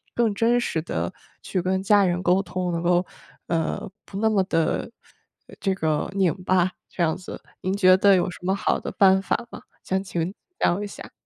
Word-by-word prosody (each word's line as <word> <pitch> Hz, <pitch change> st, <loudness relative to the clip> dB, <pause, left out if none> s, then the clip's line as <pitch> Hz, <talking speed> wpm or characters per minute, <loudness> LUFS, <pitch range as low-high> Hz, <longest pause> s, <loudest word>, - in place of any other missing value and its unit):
更 230 Hz, -3 st, +2 dB
真 235 Hz, +4 st, +2 dB
实 160 Hz, -8 st, -1 dB
地 180 Hz, -, -3 dB, 0.3 s
去 185 Hz, -, -1 dB
跟 190 Hz, +1 st, 0 dB
家 205 Hz, 0 st, +5 dB
人 180 Hz, 0 st, 0 dB
沟 180 Hz, +2 st, +3 dB
通， 180 Hz, -1 st, -3 dB
能 170 Hz, 0 st, -2 dB
够， 175 Hz, +1 st, +2 dB, 0.4 s
呃， 165 Hz, -1 st, -1 dB, 0.2 s
不 195 Hz, -, -8 dB
那 220 Hz, +1 st, +2 dB
么 195 Hz, -3 st, +3 dB
的 165 Hz, +2 st, 0 dB, 0.7 s
这 195 Hz, -2 st, 0 dB
个 155 Hz, -4 st, -1 dB
拧 190 Hz, -4 st, +3 dB
巴 185 Hz, 0 st, +2 dB, 0.2 s
这 175 Hz, -, -2 dB
样 160 Hz, -1 st, +1 dB
子。 185 Hz, -, -8 dB, 0.2 s
您 185 Hz, +1 st, -1 dB
觉 185 Hz, -2 st, +6 dB
得 195 Hz, 0 st, +5 dB
有 180 Hz, 0 st, +1 dB
什 -, -, -11 dB
么 190 Hz, +2 st, 0 dB
好 200 Hz, -, 0 dB
的 -, -, -5 dB
办 190 Hz, -1 st, +5 dB
法 235 Hz, +4 st, -1 dB
吗？ -, -, -9 dB, 0.2 s
想 190 Hz, 0 st, -1 dB
请 175 Hz, -1 st, -3 dB, 0.2 s
教 190 Hz, +4 st, +1 dB
一 205 Hz, -, -4 dB
下。 -, -, -10 dB
185 Hz, 215 characters per minute, -24 LUFS, 175-195 Hz, 0.7 s, 觉